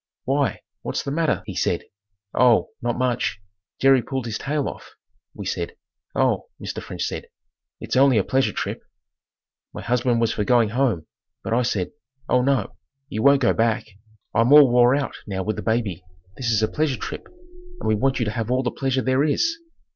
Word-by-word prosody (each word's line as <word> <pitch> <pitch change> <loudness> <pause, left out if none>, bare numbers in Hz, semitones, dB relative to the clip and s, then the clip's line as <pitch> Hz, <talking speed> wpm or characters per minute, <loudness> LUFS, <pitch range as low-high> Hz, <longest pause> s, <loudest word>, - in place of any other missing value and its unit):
"Why, 140 0 0 0.2
what's - - -3
the 140 - -4
matter?" 155 -8 0
he 100 - -6
said. 85 - 0 0.5
"Oh, 120 -2 +4
not 120 0 -1
much. 125 -4 0 0.4
Jerry 135 -1 +5
pulled 130 0 -4
his 110 -2 -3
tail 145 +1 -1
off," - - -9 0.4
we - - -7
said. - - -3 0.4
"Oh," - - +1
Mr. - - -5
French - - -5
said, - - -4 0.5
"it's - - -4
only 135 -2 +5
a 100 - +3
pleasure 135 +5 +1
trip." - - -4 0.9
My - - -6
husband 120 0 +1
was 115 -1 +1
for 105 - -1
going 115 0 +3
home, 115 -9 0 0.4
but 115 - -2
I 120 - +3
said, 105 -7 -1 0.4
"Oh 125 - +3
no, 130 -5 0 0.3
you 110 - -3
won't 140 +1 +5
go - - +4
back. 115 -1 +1 0.5
I'm 115 +4 +3
all 145 -4 +8
wore 120 +1 +5
out 140 -1 -2
now 95 -2 -3
with 110 +2 -2
the - - -4
baby. 110 -6 -1 0.3
This 120 +1 -2
is 110 -1 +2
a - - +3
pleasure 150 -2 -1
trip - - -6 0.5
and - - -4
we 110 - +3
want 130 +5 +1
you 120 - 0
to 105 - -1
have 115 0 -3
all 130 +1 +1
the 125 - -1
pleasure 135 -1 -1
there 130 +2 +2
is." 330 - +1
125 Hz, 190 wpm, -23 LUFS, 110-135 Hz, 0.9 s, all